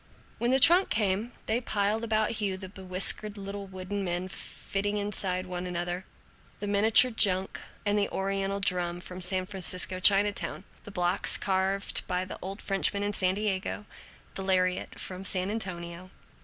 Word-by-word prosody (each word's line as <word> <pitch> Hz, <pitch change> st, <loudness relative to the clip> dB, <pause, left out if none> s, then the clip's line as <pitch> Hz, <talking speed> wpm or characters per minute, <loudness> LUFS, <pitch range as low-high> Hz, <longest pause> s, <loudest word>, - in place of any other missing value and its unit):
When 235 Hz, -, 0 dB
the 265 Hz, +1 st, +4 dB
trunk 350 Hz, +7 st, +7 dB
came 210 Hz, +2 st, -1 dB
they 225 Hz, +3 st, 0 dB
piled 215 Hz, -1 st, -1 dB
about 215 Hz, -1 st, 0 dB
Hugh 195 Hz, -2 st, -1 dB
the 190 Hz, 0 st, -8 dB
bewhiskered 190 Hz, +2 st, +3 dB
little 200 Hz, 0 st, -7 dB
wooden 190 Hz, +1 st, -5 dB
men 180 Hz, 0 st, -3 dB
fitting 200 Hz, +2 st, -4 dB
one 205 Hz, -1 st, -2 dB
inside 185 Hz, -3 st, -1 dB
another, 180 Hz, 0 st, -4 dB, 0.5 s
the 205 Hz, -, -4 dB
miniature 215 Hz, +5 st, +5 dB
junk, 190 Hz, -4 st, +1 dB, 0.3 s
and 205 Hz, 0 st, +1 dB
the 200 Hz, -, 0 dB
Oriental 195 Hz, 0 st, -2 dB
drum, 180 Hz, -3 st, 0 dB
from 180 Hz, +1 st, -9 dB
San 185 Hz, +1 st, +1 dB
Francisco 185 Hz, -1 st, +1 dB
Chinatown; 205 Hz, +2 st, +2 dB, 0.2 s
the 205 Hz, -, -9 dB
blocks 180 Hz, 0 st, +4 dB
carved 190 Hz, 0 st, -1 dB
by 180 Hz, 0 st, -2 dB
the 185 Hz, -, -9 dB
old 195 Hz, +2 st, -6 dB
Frenchman 200 Hz, +1 st, -1 dB
in 205 Hz, 0 st, -2 dB
San 185 Hz, -1 st, +1 dB
Diego; 205 Hz, 0 st, -3 dB, 0.5 s
the -, -, -6 dB
lariat 185 Hz, -1 st, -1 dB
from 185 Hz, 0 st, -7 dB
San 190 Hz, 0 st, +1 dB
Antonio. 180 Hz, -4 st, -6 dB
195 Hz, 155 wpm, -28 LUFS, 185-205 Hz, 0.5 s, trunk